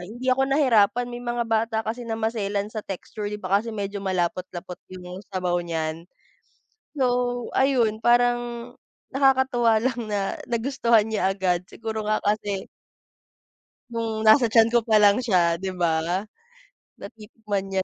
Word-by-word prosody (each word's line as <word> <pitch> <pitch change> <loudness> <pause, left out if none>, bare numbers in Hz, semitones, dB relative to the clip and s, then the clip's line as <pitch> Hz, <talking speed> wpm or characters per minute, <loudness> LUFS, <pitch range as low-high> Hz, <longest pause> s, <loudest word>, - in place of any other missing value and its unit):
hindi 240 +8 -3
ako 270 +1 +1
nahirapan 245 -4 +3
may 240 0 -6
mga 240 0 -2
bata 225 0 0
kasi 235 +2 -4
na 225 - -1
maselan 210 -2 -2
sa 215 - -3
texture 205 +2 -6
'di 210 - -4
ba 190 +2 +2
kasi 230 - -8
medyo 200 0 -4
malapot-lapot 180 -1 -3 0.2
yung 180 +1 -8
sabaw 180 -2 -1
niyan. 165 0 -4 0.9
So 245 -2 0
ayun 235 -5 +2
parang, 240 0 +1 0.4
nakakatuwa 260 -4 +3
lang 245 -1 -1
na 200 -1 -1
nagustuhan 235 -2 +2
niya 205 -3 +1
agad 180 -3 0
siguro 220 -1 -5
nga 215 0 +1
kasi 205 -2 -1 1.3
nung 225 -2 -3
nasa 220 +3 +6
tiyan 225 0 +4
ko 240 - +4
pa 220 -2 +4
lang 205 +2 +6
siya 175 -8 +2
'di 190 0 -4
ba? 170 -3 +1 1.0
Natitikman 210 -2 -6
man 190 - +1
220 Hz, 140 wpm, -24 LUFS, 195-240 Hz, 1.3 s, nasa